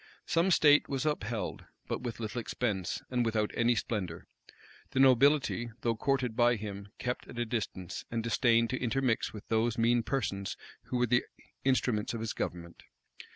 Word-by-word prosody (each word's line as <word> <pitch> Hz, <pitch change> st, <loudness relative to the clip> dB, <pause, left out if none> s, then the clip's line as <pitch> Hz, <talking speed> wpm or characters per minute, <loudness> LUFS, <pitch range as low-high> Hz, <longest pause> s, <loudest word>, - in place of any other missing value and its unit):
Some 170 Hz, +3 st, +2 dB
state 150 Hz, -4 st, +5 dB
was 135 Hz, +1 st, -1 dB
upheld; 115 Hz, -9 st, -2 dB, 0.2 s
but -, -, -3 dB
with 120 Hz, -2 st, -5 dB
little 110 Hz, +1 st, -3 dB
expense, 105 Hz, -6 st, -2 dB
and 125 Hz, -1 st, +2 dB
without 110 Hz, -2 st, 0 dB
any 120 Hz, +1 st, +3 dB
splendor. 95 Hz, -7 st, -3 dB, 0.7 s
The -, -, +1 dB
nobility, 135 Hz, -2 st, +4 dB
though 115 Hz, -1 st, +1 dB
courted 130 Hz, -1 st, 0 dB
by 120 Hz, +1 st, +4 dB
him, 100 Hz, -2 st, -6 dB
kept 125 Hz, 0 st, -3 dB
at 120 Hz, -, -10 dB
a 120 Hz, -, 0 dB
distance, 100 Hz, -6 st, -4 dB
and 115 Hz, -1 st, -2 dB
disdained 115 Hz, 0 st, +3 dB
to 130 Hz, -, -2 dB
intermix 125 Hz, -1 st, +1 dB
with 105 Hz, -, -10 dB
those 115 Hz, +1 st, +1 dB
mean 120 Hz, +1 st, +3 dB
persons 105 Hz, -6 st, -2 dB, 0.3 s
who 125 Hz, -, -2 dB
were 125 Hz, -, +3 dB
the 120 Hz, +1 st, +2 dB, 0.4 s
instruments 125 Hz, -5 st, +1 dB
of -, -, -4 dB
his 115 Hz, 0 st, -2 dB
government. 85 Hz, -1 st, -5 dB
115 Hz, 165 wpm, -31 LUFS, 110-125 Hz, 0.7 s, state